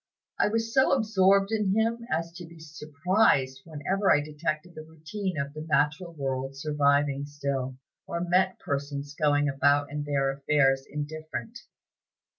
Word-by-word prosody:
I - - +4
was 225 +1 -1
so 265 -1 +4
absorbed 200 -4 +3
in 210 -3 +1
him 225 +1 +1
as 165 +1 -1
to 175 +1 -9
be 165 0 -14
surprised 150 -2 +1
whenever 180 +6 0
I - - +5
detected 155 +3 -4
the 155 - -8
routine 160 +4 -5
of 140 0 -3
the 155 - -7
natural 155 +3 0
world 135 -2 -3
surviving 145 -1 +1
still, 140 -3 -3 0.3
or 170 - -3
met 185 +2 +2
persons 140 0 -4
going 145 -1 +2
about 145 +1 +2
their 140 -2 0
affairs 135 -1 +2
indifferent." 155 +10 -6
150 Hz, 140 wpm, -27 LUFS, 140-185 Hz, 0.3 s, I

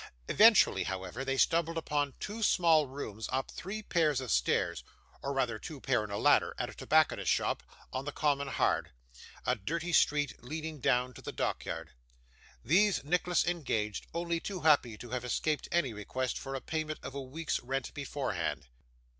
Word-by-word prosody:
Eventually, 225 +1 +6
however, 95 +6 -4
they 135 0 -1
stumbled 165 +3 +2
upon 145 -3 -1
two 215 +2 -5
small 165 -7 +4
rooms 115 -5 -6
up 130 +1 -1
three 210 +4 -6
pair 165 -6 +2
of 130 -4 -2
stairs, 60 - +1 0.4
or 140 - -2
rather 125 -5 0
two 150 +4 -8
pair 130 -4 +1
and 105 -1 -6
a 100 - -2
ladder, - - +4
at - - -3
a - - -12
tobacconist's - - +2
shop, - - +1 0.3
on 130 +1 -3
the 145 - -3
Common 140 -1 0
Hard: - - +1 0.6
a - - +2
dirty 170 - -3
street 145 -4 +2
leading 155 +3 -5
down 125 +1 +1
to - - -11
the - - -5
dockyard. - - -3 0.7
These 190 - +4
Nicholas 175 +3 +1
engaged, 125 - -2
only 170 0 -1
too 185 +1 -5
happy 145 -8 +4
to 120 +1 -10
have 125 -1 -2
escaped 150 +5 -1
any 150 -9 +1
request 120 +5 -3
for 135 0 -4
payment 155 +1 -3
of - - -6
a 140 - -4
week's 150 +4 -3
rent 135 +1 -3
beforehand. 130 - -3
140 Hz, 170 wpm, -31 LUFS, 125-165 Hz, 0.7 s, Eventually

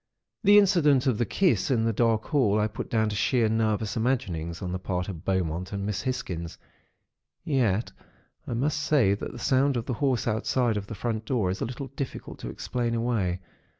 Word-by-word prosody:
"The 205 0 +7
incident 155 -9 +4
of 125 -6 +1
the 120 - +1
kiss 185 -5 +2
in 120 -4 +2
the 115 - +1
dark 115 0 +2
hall, 115 -9 +2
I 105 - +2
put 105 -1 -5
down 110 -2 +1
to 105 - -3
sheer 115 +3 +2
nervous 110 0 0
imaginings 90 -9 -1
on 90 - -4
the 90 - -3
part 90 -1 -2
of 85 -4 -7
Beaumont 90 -2 -1
and 100 -1 -3
Miss 105 -2 -2
Hisgins; 90 -11 -4 0.9
yet, 120 - +1 0.6
I - - -2
must 145 +5 0
say 145 -9 +3
that 100 - -4
the - - -9
sound 135 +2 +2
of 115 - -3
the 125 - -2
horse 130 -5 +1
outside 115 +1 +1
of 100 -1 -4
the 110 - -6
front 110 +1 -3
door, 110 -7 0
is 95 - -5
a - - +1
little 130 +3 -6
difficult 135 0 -6
to - - -6
explain 120 -2 -2
away. 110 -7 0
115 Hz, 200 wpm, -27 LUFS, 100-130 Hz, 0.9 s, The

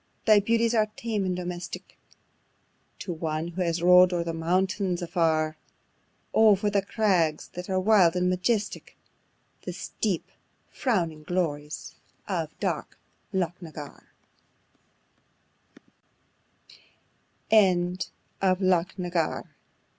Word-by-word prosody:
thy 215 -2 +7
beauties 230 +3 +2
are 215 -2 +3
tame 220 -4 -2
and 185 -1 -1
domestic, 180 0 -6 1.0
To 180 - -5
one 160 0 -3
who 175 +2 -4
has 170 -1 0
rov'd 180 +1 +7
on 170 -1 0
the 165 -1 -3
mountains 185 +2 0
afar: 160 -3 +1 0.8
Oh! 220 -2 +6
for 205 +2 -1
the 200 -1 +2
crags 190 -7 +1
that 180 +1 -8
are 190 0 +1
wild 185 -4 +4
and 180 0 +1
majestic, 200 +4 -1 0.6
The - - -6
steep, - - -3 0.4
frowning 170 - -1
glories 155 -4 -3 0.3
of - - -3
dark - - -3 0.3
Loch 180 -2 -2
na 170 - -8
Garr. 150 -2 -8
180 Hz, 100 wpm, -27 LUFS, 165-200 Hz, 1.0 s, thy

